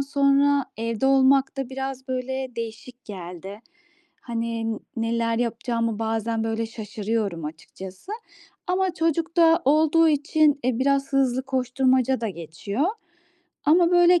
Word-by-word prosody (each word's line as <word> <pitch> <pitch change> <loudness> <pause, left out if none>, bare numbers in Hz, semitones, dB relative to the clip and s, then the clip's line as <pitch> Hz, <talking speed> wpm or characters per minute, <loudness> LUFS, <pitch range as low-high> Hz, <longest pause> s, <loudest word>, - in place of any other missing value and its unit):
sonra, 280 0 +3
evde 230 +2 -1
olmak 270 0 +4
da 270 -2 -3
biraz, 265 0 -5
böyle, 260 +1 -3
değişik 230 +2 -7
geldi. 190 +1 -8 0.6
Hani, 230 -1 -2
n - - -7 0.2
neler 230 0 0
yapacağımı 230 -1 -1
bazen, 225 0 -1
böyle, 225 0 -1
şaşırıyorum 215 -5 -3
açıkçası 185 - -9 0.5
ama 370 0 0
çocuk 330 +1 -1
da 330 0 +5
olduğu 315 +3 +4
için, 295 0 +2
e, 255 -2 +1
biraz 275 0 +1
hızlı 260 -1 +2
koşturmaca 260 -1 +1
da 225 - -1
geçiyor 185 - -4 0.8
ama, 335 +3 +5
böyle, 350 0 +5
255 Hz, 125 wpm, -24 LUFS, 225-280 Hz, 0.8 s, da